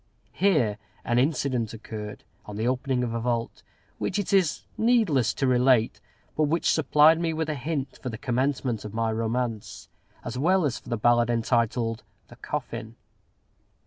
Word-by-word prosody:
Here 140 Hz, -, +2 dB, 0.3 s
an 120 Hz, +1 st, +2 dB
incident 125 Hz, -5 st, 0 dB
occurred, 105 Hz, -1 st, -8 dB, 0.2 s
on 105 Hz, -, -7 dB
the 110 Hz, +3 st, -1 dB
opening 130 Hz, 0 st, 0 dB
of 115 Hz, -2 st, -2 dB
a 115 Hz, -, -1 dB
vault, 115 Hz, 0 st, -2 dB, 0.4 s
which 185 Hz, -, -1 dB
it 205 Hz, -1 st, -2 dB
is 185 Hz, -5 st, +2 dB
needless 220 Hz, -, +3 dB
to 135 Hz, -, 0 dB
relate, 125 Hz, -2 st, +3 dB, 0.3 s
but 155 Hz, -, +2 dB
which 165 Hz, +3 st, +1 dB
supplied 155 Hz, +1 st, +5 dB
me 165 Hz, -1 st, 0 dB
with 160 Hz, 0 st, -2 dB
a -, -, 0 dB
hint 140 Hz, -1 st, -4 dB
for 130 Hz, -, -4 dB
the 110 Hz, -, -6 dB
commencement 125 Hz, -2 st, -1 dB
of 105 Hz, 0 st, -8 dB
my 115 Hz, 0 st, 0 dB
romance, 115 Hz, 0 st, -3 dB, 0.4 s
as 125 Hz, -, -4 dB
well 180 Hz, +4 st, +3 dB
as 130 Hz, -5 st, -1 dB
for -, -, -14 dB
the 120 Hz, -, -1 dB
ballad 120 Hz, +1 st, +3 dB
entitled 115 Hz, -1 st, 0 dB, 0.3 s
"The -, -, -13 dB
Coffin." 115 Hz, -1 st, -5 dB
125 Hz, 165 wpm, -26 LUFS, 115-150 Hz, 0.4 s, supplied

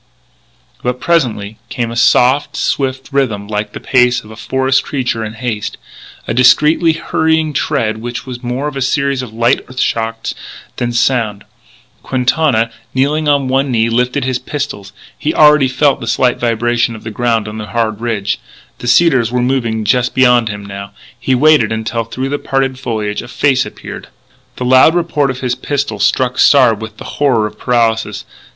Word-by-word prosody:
But, 125 Hz, 0 st, -2 dB
presently, 115 Hz, -11 st, 0 dB
came 120 Hz, -2 st, -3 dB
a -, -, -6 dB
soft, 130 Hz, +4 st, +3 dB
swift 135 Hz, -1 st, -2 dB
rhythm 115 Hz, -8 st, -1 dB
like 105 Hz, 0 st, -3 dB
the -, -, -6 dB
pace 125 Hz, -1 st, +2 dB
of 110 Hz, -, -13 dB
a -, -, -10 dB
forest 130 Hz, +4 st, 0 dB
creature 125 Hz, -5 st, -2 dB
in 110 Hz, 0 st, -5 dB
haste 110 Hz, -2 st, -4 dB, 0.5 s
a -, -, -1 dB
discreetly 150 Hz, +7 st, +4 dB
hurrying 160 Hz, -1 st, 0 dB
tread 115 Hz, -8 st, -1 dB
which 120 Hz, +2 st, -6 dB
was 125 Hz, -2 st, -7 dB
more 130 Hz, +4 st, -2 dB
a 135 Hz, -, -3 dB
series 140 Hz, 0 st, 0 dB
of 125 Hz, -4 st, -8 dB
light 120 Hz, +3 st, +1 dB
earth 130 Hz, 0 st, -8 dB
shocks 115 Hz, -1 st, -1 dB, 0.4 s
than 120 Hz, 0 st, -1 dB
sound. 120 Hz, -4 st, 0 dB, 0.6 s
Quintana, 125 Hz, -2 st, +1 dB, 0.2 s
kneeling 150 Hz, +4 st, +1 dB
on 140 Hz, -2 st, +2 dB
one 135 Hz, +2 st, +1 dB
knee, 115 Hz, -2 st, +1 dB
lifted 125 Hz, +3 st, 0 dB
his 130 Hz, -1 st, -1 dB
pistol. 130 Hz, -6 st, -5 dB, 0.3 s
He -, -, -1 dB
already 150 Hz, -3 st, +6 dB
felt 140 Hz, +2 st, +2 dB
the 115 Hz, -, -6 dB
slight 125 Hz, +2 st, +1 dB
vibration 120 Hz, 0 st, 0 dB
of 110 Hz, -, -11 dB
the 110 Hz, -, -6 dB
ground 115 Hz, -1 st, 0 dB
on 105 Hz, +1 st, -6 dB
the 105 Hz, -, -6 dB
hard 110 Hz, 0 st, -2 dB
ridge. 110 Hz, -4 st, -2 dB, 0.4 s
The 120 Hz, -, -6 dB
cedars 125 Hz, -3 st, +3 dB
were 125 Hz, -, 0 dB
moving 115 Hz, -4 st, -1 dB
just 125 Hz, +4 st, +1 dB
beyond 125 Hz, -3 st, +4 dB
him 105 Hz, -1 st, -6 dB
now. 100 Hz, 0 st, -8 dB, 0.3 s
He 130 Hz, -, +1 dB
waited 145 Hz, -4 st, +4 dB
until, 110 Hz, +1 st, -2 dB
through 130 Hz, +4 st, -4 dB
the 145 Hz, -, -2 dB
parted 135 Hz, -1 st, -1 dB
foliage, 110 Hz, -5 st, -3 dB
a -, -, -10 dB
face 130 Hz, 0 st, +1 dB
appeared. -, -, -9 dB, 0.5 s
The 125 Hz, -, -4 dB
loud 130 Hz, +6 st, +5 dB
report 160 Hz, -5 st, +1 dB
of 130 Hz, -1 st, -4 dB
his 125 Hz, -2 st, 0 dB
pistol 135 Hz, -3 st, -3 dB
struck 125 Hz, +4 st, +1 dB
Sard 125 Hz, -6 st, +5 dB
with 110 Hz, -1 st, -8 dB
the -, -, -9 dB, 0.2 s
horror 125 Hz, -7 st, +3 dB
of 105 Hz, 0 st, -7 dB
paralysis. 115 Hz, -3 st, 0 dB
125 Hz, 175 wpm, -15 LUFS, 115-135 Hz, 0.6 s, already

